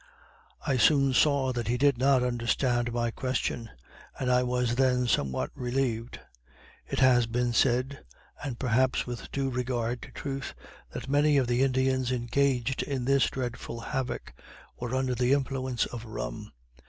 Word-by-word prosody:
I 135 - +1
soon 140 +1 +4
saw 135 -1 +3
that 120 -3 -3
he 120 +1 +1
did 140 +1 +4
not 135 -1 +4
understand 120 0 0
my 120 0 -1
question, 120 -2 -2 0.5
and 125 -1 0
I 125 0 +4
was 125 -1 0
then 125 0 +2
somewhat 70 - 0
relieved. 120 -2 -2 0.7
It - - -4
has 125 -3 +5
been 120 +1 0
said, 130 +3 +1 0.4
and 135 -5 -4
perhaps 130 +1 +1
with 120 -1 -7
due 135 -1 -1
regard 120 -1 -2
to - - -10
truth, 135 -1 -5 0.3
that - - -7
many 145 +1 +3
of 135 - +3
the 120 +1 +1
Indians 130 -1 +1
engaged 125 +1 0
in 135 -3 -3
this 140 0 +3
dreadful 120 -2 -5
havoc, 130 +2 -4 0.5
were 120 +1 -3
under 130 -1 0
the 125 +2 +2
influence 130 -3 0
of 120 -2 -7
rum. 110 -1 -6
125 Hz, 155 wpm, -28 LUFS, 120-135 Hz, 0.7 s, has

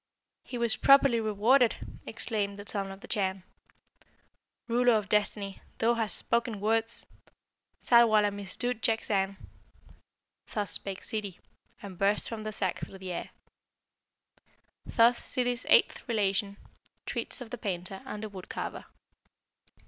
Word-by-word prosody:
"He 245 - -6
was 235 -2 +2
properly 275 -3 +6
rewarded!" 225 +4 +3 0.3
exclaimed 200 -3 -2
the 205 0 -10
Son 195 -2 -1
of 195 +1 -11
the 250 - -11
Chan. 190 -3 -1 1.2
"Ruler 245 +1 +4
of 210 -2 +1
Destiny, 205 -1 0 0.2
thou 230 +1 +3
hast 225 -5 +2
spoken 235 -2 0
words! 225 +2 0 0.7
Ssarwala 220 -4 +5
missdood 205 +4 -3
jakzang!" 200 -4 0 1.1
Thus 205 -2 -2
spake 195 -1 -4
Ssidi, 205 -5 -4 0.5
and 190 -3 -9
burst 200 +1 +2
from 225 -2 -5
the 215 0 -4
sack 190 -3 -2
through 195 - -8
the 190 -1 -6
air. 175 - -4 1.6
Thus 235 +1 +4
Ssidi's 245 -2 -2
eighth - - +4
relation 200 -2 0 0.5
treats - - -2
of 240 -3 -9
the 245 - -6
Painter 190 -2 -4
and 210 - -7
the 215 - -4
Wood 190 -2 -10
carver. - - -5
210 Hz, 130 wpm, -29 LUFS, 195-235 Hz, 1.6 s, properly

